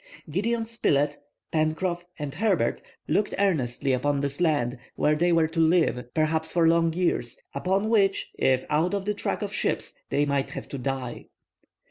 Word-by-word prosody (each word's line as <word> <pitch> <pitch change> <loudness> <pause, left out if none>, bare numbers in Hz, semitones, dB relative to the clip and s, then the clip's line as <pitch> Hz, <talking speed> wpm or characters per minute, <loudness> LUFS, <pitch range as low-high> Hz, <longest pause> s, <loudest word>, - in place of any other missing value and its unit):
Gideon 225 +7 0
Spilett, 145 -11 +1 0.3
Pencroff, 165 +3 0
and 145 -2 -4
Herbert 180 - +1 0.3
looked 210 - +1
earnestly 140 -9 +1
upon 140 +3 +1
this 140 +3 -2
land 140 -7 +1 0.2
where 150 - +2
they 175 +3 +2
were 165 -1 +4
to 165 0 -3
live, 160 -7 +2
perhaps 160 0 +1
for 170 -2 +3
long 165 0 +4
years; 165 -9 -1
upon 190 +8 0
which, 200 -4 +2
if 130 -1 +1
out 160 +6 +1
of 195 -1 -3
the 210 - 0
track 205 - -2
of 205 0 -4
ships, - - -1 0.2
they 145 +1 +2
might 140 -1 0
have - - -7
to 140 - -5
die. 130 -1 -4
160 Hz, 165 wpm, -26 LUFS, 140-185 Hz, 0.3 s, were